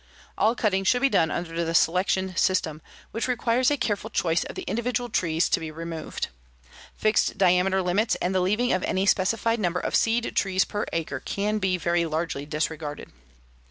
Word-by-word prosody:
"All 225 +2 +2
cutting 195 -5 +1
should 245 +6 +2
be 275 - +5
done 160 -10 +3
under 170 +1 -3
the 165 0 -2
'selection 185 +2 +2
system,' 165 -5 +1 0.3
which 230 - -2
requires 250 0 +2
a 290 - +1
careful 220 -3 -2
choice 170 -5 +1
of - - -8
the 375 - -5
individual 245 -2 -2
trees 165 -5 +1
to - - +2
be 160 -1 -5
removed. 165 0 -5 0.7
Fixed 215 0 +1
diameter 185 +1 +3
limits 205 +6 +1
and 180 - -2
the 185 - +2
leaving 210 +7 +1
of 185 - +1
any 190 +1 0
specified 225 +4 +2
number 180 -3 0
of - - -2
seed 230 +1 +1
trees 190 -1 +2
per 205 0 -3
acre 155 -5 -3
can 210 +8 -2
be 185 -2 +1
very 170 0 0
largely 155 -2 -3
disregarded. 150 -1 -4
185 Hz, 180 wpm, -25 LUFS, 165-220 Hz, 0.7 s, be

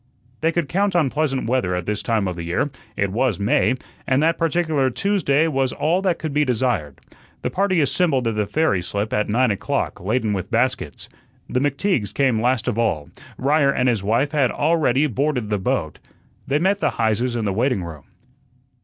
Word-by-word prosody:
They 165 +1 +1
could 170 -3 -1
count 195 +4 0
on 155 -7 +2
pleasant 145 -5 -1
weather 115 -8 0
at 90 -1 -3
this 105 0 -2
time 110 -4 0
of 90 - -3
the 85 - -6
year 85 +12 -1 0.3
it 100 -1 0
was 115 -1 0
May 130 +5 +2 0.3
and 135 +3 +2
that 165 +1 +2
particular 160 -4 +1
Tuesday 160 -1 +1
was 135 -4 0
all 170 +5 0
that 185 -3 +1
could 155 -3 -4
be 150 +1 +3
desired. 120 - -1 0.4
The - - -1
party 190 -3 +1
assembled 140 -3 +1
at 115 - -1
the 105 -1 0
ferry 155 - +1
slip 100 +4 -3
at 105 0 0
nine 120 +2 +2
o'clock, 100 - -2
laden 110 +2 0
with 95 -1 -4
baskets. 125 +2 -1 0.4
The 125 - 0
McTeagues 140 - 0
came 130 -5 +2
last 125 0 +1
of 115 -2 -1
all; 80 -11 -1 0.3
Ryer 140 +1 +3
and 125 -1 +1
his 115 -5 +1
wife 115 +8 +1
had 140 -5 +2
already 150 -3 +2
boarded 130 -4 -1
the 105 - +1
boat. 95 - -2 0.5
They 140 - +2
met 190 +5 +1
the - - +2
Heises 115 +2 +1
in 115 -2 -1
the 100 - 0
waiting 120 -2 0
room. 80 -4 -9
130 Hz, 195 wpm, -21 LUFS, 105-150 Hz, 0.5 s, be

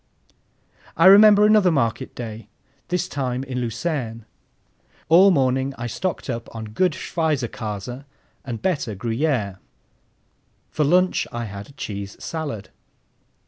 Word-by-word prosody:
I 165 - +4
remember 205 +2 +8
another 210 -3 +5
market 115 -7 -1
day, 110 -3 -7 0.4
this 180 +1 -1
time 130 -5 -3
in 130 -2 -4
Lucerne. 115 -2 -3 0.8
All 180 +5 +7
morning 135 -4 +1
I 120 - -5
stocked 175 +9 -3
up 115 -3 -4
on 110 -1 -5
good 180 +7 +2
Schweizerkäse 125 - -3 0.4
and 120 -4 -6
better 145 - -1
Gruyère. 115 -2 -1 1.1
For 155 - 0
lunch 180 +5 +2
I 120 0 -4
had 100 +7 -9
cheese 100 -4 -6
salad. 145 -11 -5
130 Hz, 115 wpm, -22 LUFS, 115-165 Hz, 1.1 s, remember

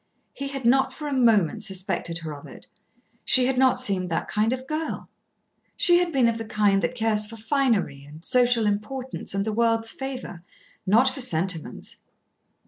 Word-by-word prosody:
He 275 - -5
had 275 -2 -6
not 265 +3 +4
for 300 - -7
a 290 - -2
moment 225 -9 +3
suspected 185 -3 -3
her 160 -2 -6
of 145 - -11
it. - - -13 0.6
She 255 -1 +4
had 265 +1 +1
not 260 0 +3
seemed 185 -3 +1
that 165 - -2
kind 215 +2 +1
of 260 0 -3
girl. 310 +3 -4 0.7
She 350 0 +4
had 355 -1 0
been 260 -5 +3
of 230 0 0
the 225 - -5
kind 205 -2 +2
that 170 +9 -2
cares 220 -2 +2
for 225 +1 -8
finery 225 - 0
and 150 +4 -11
social 245 -3 +3
importance 215 +3 -3
and 195 0 0
the 220 - -2
world's 225 0 +1
favour, 260 -9 -6 0.5
not 230 +7 +5
for 265 +1 -6
sentiments. 175 -6 -3
225 Hz, 180 wpm, -25 LUFS, 195-260 Hz, 0.7 s, not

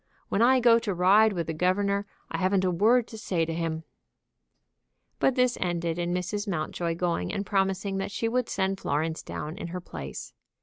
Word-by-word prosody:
When 200 - +1
I 255 +2 +6
go 235 -1 +6
to 210 -5 -3
ride 200 +5 +5
with 170 -3 -2
the 160 - -3
governor 200 +4 +1 0.2
I - - -2
haven't 190 0 +2
a 180 - +2
word 225 +7 +3
to 220 - -9
say 175 -6 0
to 165 - -3
him," 165 -1 -2 1.4
But 265 - +3
this 250 -1 +2
ended 170 -2 -1
in 175 0 -1
Mrs. 190 +4 -2
Mountjoy 170 -1 -2
going 170 - -1
and 200 - -3
promising 195 0 0
that 195 - -2
she 225 +3 -2
would 245 +1 0
send 190 0 -1
Florence 160 +3 -1
down 155 +4 -6
in 170 - -4
her 180 +2 -5
place. 175 - -8
190 Hz, 190 wpm, -27 LUFS, 170-210 Hz, 1.4 s, I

